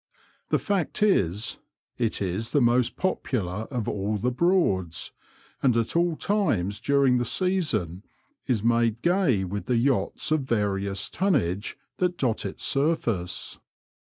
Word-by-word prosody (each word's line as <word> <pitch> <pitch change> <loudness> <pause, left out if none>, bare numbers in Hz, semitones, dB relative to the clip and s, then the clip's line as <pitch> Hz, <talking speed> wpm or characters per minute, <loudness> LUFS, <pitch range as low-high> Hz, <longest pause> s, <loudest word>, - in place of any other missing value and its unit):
The - - +3
fact 200 0 -1
is, 105 - +1 0.4
it 115 -4 0
is 100 +5 -3
the 145 - +4
most 120 -1 +2
popular 110 - -2
of 125 -5 -3
all 105 +1 -1
the 120 +5 0
Broads, 125 - +1 0.5
and 125 -4 +3
at 115 +5 -1
all 170 -1 +2
times 115 - 0
during 140 -3 +3
the - - 0
season 150 - 0 0.4
is 120 -6 0
made 115 -1 +2
gay 170 - +2
with 100 +2 -5
the 125 - +2
yachts 135 +4 0
of 155 - +3
various 100 -5 0
tonnage 110 - 0 0.2
that 180 -1 0
dot 115 -6 0
its 95 - -7
surface. 115 - 0
120 Hz, 135 wpm, -26 LUFS, 100-155 Hz, 0.5 s, the